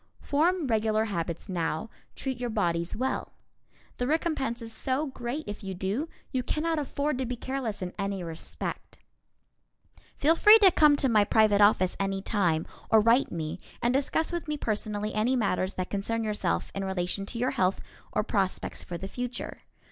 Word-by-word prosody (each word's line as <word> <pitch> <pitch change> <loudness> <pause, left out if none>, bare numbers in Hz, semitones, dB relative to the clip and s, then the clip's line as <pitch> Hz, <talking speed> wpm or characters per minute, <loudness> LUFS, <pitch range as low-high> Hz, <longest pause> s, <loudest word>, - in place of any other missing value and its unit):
Form 330 +4 +1
regular 220 -2 +2
habits 170 -5 -3
now, 170 +1 -2 0.2
treat 265 -2 -4
your 245 -1 -2
bodies 170 -6 0
well. 260 +4 -2 0.6
The 245 - -1
recompense 295 -6 0
is 225 -1 -8
so 265 +6 -1
great 265 +1 -4
if 205 +1 -6
you 190 -1 -4
do, 200 - -2 0.2
you 260 - 0
cannot 315 +5 -1
afford 285 -1 -1
to 260 - 0
be 250 - -2
careless 245 -5 -3
in 180 - -5
any 195 -2 -2
respect. 165 -1 -6 1.2
Feel 310 +3 +4
free 420 +6 +9
to 400 -4 +6
come 300 -3 +6
to 280 - +2
my 215 -4 +5
private 210 -1 +4
office 205 -3 +4
any 195 0 0
time, 180 -6 +1 0.2
or 220 - +6
write 230 +5 +4
me, 165 +1 -4 0.2
and 240 +1 +1
discuss 285 +5 +1
with 345 -1 -3
me 300 0 -1
personally 210 -3 -2
any 225 +5 +2
matters 195 -5 0
that 185 -1 -3
concern 225 +3 -1
yourself 210 - -1
in 195 - -3
relation 190 +1 -2
to 235 - -6
your 250 +3 +1
health 195 -8 +1 0.3
or - - +1
prospects 195 -3 -1
for 175 - -5
the 190 - -6
future. 245 +3 -5
220 Hz, 175 wpm, -28 LUFS, 195-265 Hz, 1.2 s, free